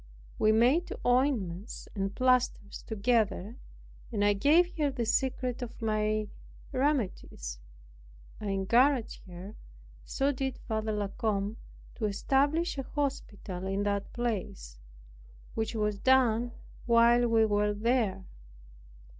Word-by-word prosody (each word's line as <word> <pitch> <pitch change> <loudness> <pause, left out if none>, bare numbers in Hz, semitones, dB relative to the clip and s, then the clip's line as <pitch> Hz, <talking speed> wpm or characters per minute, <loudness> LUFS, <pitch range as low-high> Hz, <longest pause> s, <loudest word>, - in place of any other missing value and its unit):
We 215 - +4
made 250 +11 +3
ointments 240 -8 0
and 195 -1 -3
plasters 255 -5 +1
together, 220 0 0 0.5
and 205 -3 +1
I 205 - +4
gave 320 - +3
her 295 -2 +2
the 255 -4 -2
secret 255 +1 0
of 240 -2 -7
my 215 -1 0 0.4
remedies, 225 - -2 0.8
I 210 - -5
encouraged 235 +6 +2
her, 175 0 -9
and 215 - -13 0.5
so 275 - 0
did 265 -1 -3
Father 220 -1 -1
La 205 -2 -2
Combe, 210 -1 -1 0.4
to 220 - -3
establish 280 - +1
an 270 - -3
hospital 205 -11 -4
in 195 +1 -1
that 200 -1 -2
place; 185 - -4 0.7
which 220 +1 -2
was 210 -2 -1
done 245 -2 +3 0.4
while 235 +1 +5
we 225 -1 +4
were 210 0 +1
there. 210 -4 0
225 Hz, 120 wpm, -30 LUFS, 205-255 Hz, 0.8 s, while